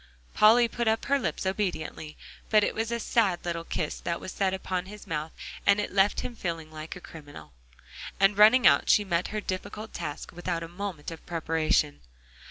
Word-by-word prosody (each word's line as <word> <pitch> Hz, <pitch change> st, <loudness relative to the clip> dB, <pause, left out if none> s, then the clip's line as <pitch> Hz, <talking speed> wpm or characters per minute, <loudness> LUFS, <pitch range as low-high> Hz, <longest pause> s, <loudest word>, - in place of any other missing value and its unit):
Polly 230 Hz, +3 st, +6 dB
put 235 Hz, +1 st, -3 dB
up 220 Hz, 0 st, +1 dB
her 280 Hz, 0 st, +2 dB
lips 250 Hz, -, -3 dB
obediently. 185 Hz, -5 st, -3 dB, 0.3 s
But 215 Hz, -1 st, +5 dB
it -, -, 0 dB
was 225 Hz, +1 st, -2 dB
a 235 Hz, -, -1 dB
sad 205 Hz, -7 st, +1 dB
little 170 Hz, -1 st, -2 dB
kiss 160 Hz, -2 st, -3 dB
that 170 Hz, 0 st, -3 dB
was 185 Hz, -, -7 dB
set 195 Hz, -1 st, 0 dB
upon 185 Hz, -1 st, -3 dB
his 210 Hz, +1 st, -10 dB
mouth, 155 Hz, 0 st, -3 dB, 0.3 s
and 200 Hz, 0 st, +4 dB
it 205 Hz, -, -3 dB
left 195 Hz, +1 st, +3 dB
him 245 Hz, -, -6 dB
feeling 165 Hz, -6 st, -4 dB
like 155 Hz, +1 st, -7 dB
a -, -, -8 dB
criminal. 145 Hz, -, -12 dB, 0.7 s
And 195 Hz, +1 st, +4 dB
running 220 Hz, +5 st, +6 dB
out, -, -, +5 dB
she 210 Hz, -, +5 dB
met 175 Hz, -1 st, 0 dB
her 215 Hz, -, -3 dB
difficult 210 Hz, +3 st, -5 dB
task 155 Hz, -3 st, -5 dB
without 175 Hz, -1 st, -3 dB
a -, -, -6 dB
moment 175 Hz, -3 st, -6 dB
of 165 Hz, -, -10 dB
preparation. 160 Hz, -3 st, 0 dB
185 Hz, 190 wpm, -28 LUFS, 165-210 Hz, 0.7 s, Polly